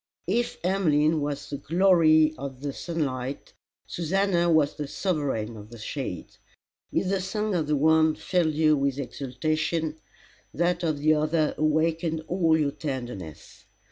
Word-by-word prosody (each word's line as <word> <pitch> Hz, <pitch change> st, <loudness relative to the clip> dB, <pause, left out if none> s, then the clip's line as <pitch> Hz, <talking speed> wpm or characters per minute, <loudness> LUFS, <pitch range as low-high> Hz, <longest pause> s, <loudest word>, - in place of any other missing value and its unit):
If 235 Hz, +7 st, -1 dB
Emmeline 160 Hz, -5 st, +2 dB
was 145 Hz, 0 st, -3 dB
the 140 Hz, -, -2 dB
glory 160 Hz, -3 st, +4 dB
of 135 Hz, -2 st, -7 dB
the 140 Hz, -1 st, -3 dB
sunlight 140 Hz, -6 st, -4 dB, 0.3 s
Susannah 175 Hz, 0 st, +1 dB
was 155 Hz, -3 st, +3 dB
the 150 Hz, -, -5 dB
sovereign 140 Hz, -, -2 dB
of 105 Hz, 0 st, -11 dB
the 120 Hz, -, -11 dB
shade. 110 Hz, -, -6 dB, 0.5 s
If -, -, 0 dB
the 195 Hz, -1 st, 0 dB
song 210 Hz, +2 st, -2 dB
of 160 Hz, -4 st, 0 dB
the 150 Hz, -, +2 dB
one 160 Hz, +1 st, +4 dB
filled 160 Hz, 0 st, 0 dB
you 155 Hz, 0 st, +4 dB
with 140 Hz, -1 st, 0 dB
exultation, 155 Hz, +5 st, -2 dB, 0.6 s
that 175 Hz, +1 st, +1 dB
of 160 Hz, -4 st, 0 dB
the 155 Hz, +2 st, +3 dB
other 155 Hz, 0 st, +1 dB
awakened 160 Hz, +1 st, 0 dB
all 165 Hz, -3 st, +2 dB
your 145 Hz, -3 st, +1 dB
tenderness. 120 Hz, -, -7 dB
155 Hz, 140 wpm, -26 LUFS, 140-170 Hz, 0.6 s, glory